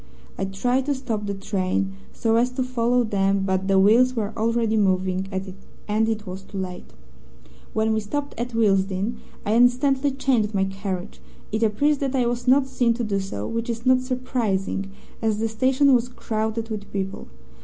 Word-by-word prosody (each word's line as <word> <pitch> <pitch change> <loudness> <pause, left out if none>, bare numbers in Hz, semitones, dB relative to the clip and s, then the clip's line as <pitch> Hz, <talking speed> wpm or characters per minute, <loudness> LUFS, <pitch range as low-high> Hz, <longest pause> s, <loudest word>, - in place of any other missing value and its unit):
I 195 - -2
tried 245 +8 0
to 285 - +1
stop 225 -6 -3
the 200 - -2
train 195 -1 -1 0.2
so 225 -1 +1
as 240 +2 +3
to 255 - 0
follow 245 -1 +1
them, 195 -2 +1
but 190 0 0
the 195 -1 +3
wheels 240 +6 +5
were 220 -2 -2
already 230 0 +1
moving, 190 -2 +1 0.6
and 220 +1 +1
it 215 -1 -2
was 185 0 -6
too 195 - -10
late. 185 -1 -6 0.8
"When 220 0 +1
we 220 - +1
stopped 285 +7 -3
at 240 0 -3
Willesden, 200 0 +1 0.3
I 210 - +1
instantly 260 +4 +3
changed 250 -6 0
my 190 - +3
carriage. 190 -1 -4 0.3
It 215 +1 -1
appears 270 +7 +2
that 275 -1 -1
I 250 -2 +2
was 240 +1 -2
not 265 +2 +5
seen 245 -3 +1
to 240 - -2
do 200 -3 0
so, 150 - -4
which 230 +1 -3
is 230 +1 -4
not 255 0 +5
surprising, 235 -7 -2 0.3
as 220 -2 +1
the 225 +1 0
station 260 +5 +3
was 245 0 +2
crowded 220 -1 -3
with 205 -2 -5
people. 195 -1 -4
220 Hz, 180 wpm, -24 LUFS, 195-250 Hz, 0.8 s, wheels